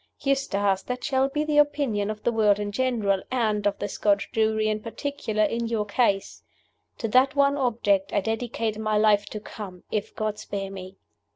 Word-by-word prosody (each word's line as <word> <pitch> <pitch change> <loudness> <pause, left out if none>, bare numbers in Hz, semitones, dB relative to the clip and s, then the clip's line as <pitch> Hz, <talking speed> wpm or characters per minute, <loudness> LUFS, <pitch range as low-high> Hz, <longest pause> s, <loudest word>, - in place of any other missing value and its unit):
Eustace, 205 -9 +1
that 250 0 -5
shall 270 -1 +1
be 295 +2 -1
the 300 -1 +2
opinion 280 -9 +1
of 215 0 -5
the 240 - +2
world 210 -3 +3
in 205 0 -3
general, 215 -5 +1
and 215 -5 +1
of 205 - 0
the 205 - -3
Scotch 200 0 0
jury 220 -1 +1
in 215 0 0
particular, 225 -1 -2
in 230 +3 0
your 225 -2 -1
case. 205 -2 0 0.6
To 225 - -2
that 260 +5 +4
one 280 0 +4
object 220 -7 +1
I - - +2
dedicate 225 0 -2
my 215 -1 0
life 210 -1 +3
to 215 - -6
come, 195 -4 -9
if 215 0 -3
God 215 -1 -2
spare 195 -1 -5
me! 190 0 -9
215 Hz, 185 wpm, -25 LUFS, 205-250 Hz, 0.6 s, that